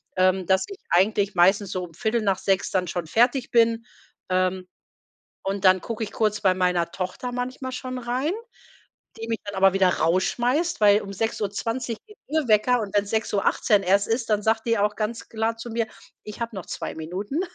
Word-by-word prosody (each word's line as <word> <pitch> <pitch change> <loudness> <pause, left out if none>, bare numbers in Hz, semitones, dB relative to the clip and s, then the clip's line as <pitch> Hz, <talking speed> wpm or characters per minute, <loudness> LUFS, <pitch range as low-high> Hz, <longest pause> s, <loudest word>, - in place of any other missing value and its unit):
ähm, 185 0 +2
dass 190 +2 +3
ich 395 -1 -9
eigentlich 200 +2 +2
meistens 190 +2 +4
so 185 -1 -2
um 170 -2 -10
6:15 200 -2 0
dann 185 -2 0
schon 175 -1 -3
fertig 245 - +2
bin. 230 0 +3 0.4
Ähm, 185 0 0 0.8
und 195 0 -2
dann 185 0 +6
gucke 230 -1 -4
ich 210 - -5
kurz 215 -1 0
bei 190 -3 +4
meiner 180 -2 0
Tochter 185 +8 -4
manchmal 255 +1 -4
schon 255 0 -5
rein, 250 +6 -1 0.9
die 225 - -6
mich 225 -1 -2
dann 205 - -5
aber 190 0 +4
wieder 195 -1 +4
rausschmeißt, 240 - +1
weil 205 0 +6
um 195 - -8
6:20 225 +3 -2
geht 425 -1 -16
ihr 310 -1 0
Wecker 225 +3 +4
und 205 -2 -5
wenn's 205 0 +1
6:18 210 -1 +1
erst 200 +2 +3
ist, 225 +1 -1
dann 210 -1 +2
sagt 220 +1 +1
die 230 - +2
auch 210 +1 +1
ganz 225 +2 -3
klar 225 0 -1
zu 230 +1 -7
mir: 230 0 -1 0.4
„Ich 210 - -9
habe 230 -1 -3
noch 190 - -6
2 - - -5
Minuten.“ 190 - -3
210 Hz, 185 wpm, -24 LUFS, 190-230 Hz, 0.9 s, dann